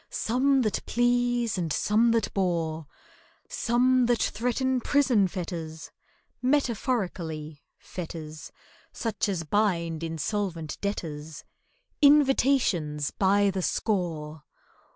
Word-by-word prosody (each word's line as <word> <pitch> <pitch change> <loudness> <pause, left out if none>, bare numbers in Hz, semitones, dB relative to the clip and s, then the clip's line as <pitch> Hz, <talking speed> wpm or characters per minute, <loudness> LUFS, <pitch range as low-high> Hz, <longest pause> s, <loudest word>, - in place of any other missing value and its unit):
Some 265 +3 +1
that 215 - -1
please 240 -3 +1
and 165 -3 -2
some 220 +8 +2
that 230 -2 +1
bore, 165 -5 -1 0.6
Some 250 +1 +2
that 240 -1 +3
threaten 250 +3 0
prison 250 -8 +3
fetters 165 -3 -6 0.5
(Metaphorically, 195 - -1 0.2
fetters 160 -3 -8 0.4
Such 225 -2 -2
as 180 -4 -2
bind 170 -3 0
insolvent 165 0 -3
debtors)— 160 -6 -5 0.6
Invitations 265 - +3
by 200 +1 +2
the 190 0 -3
score. 165 -7 -2
200 Hz, 90 wpm, -27 LUFS, 165-240 Hz, 0.6 s, that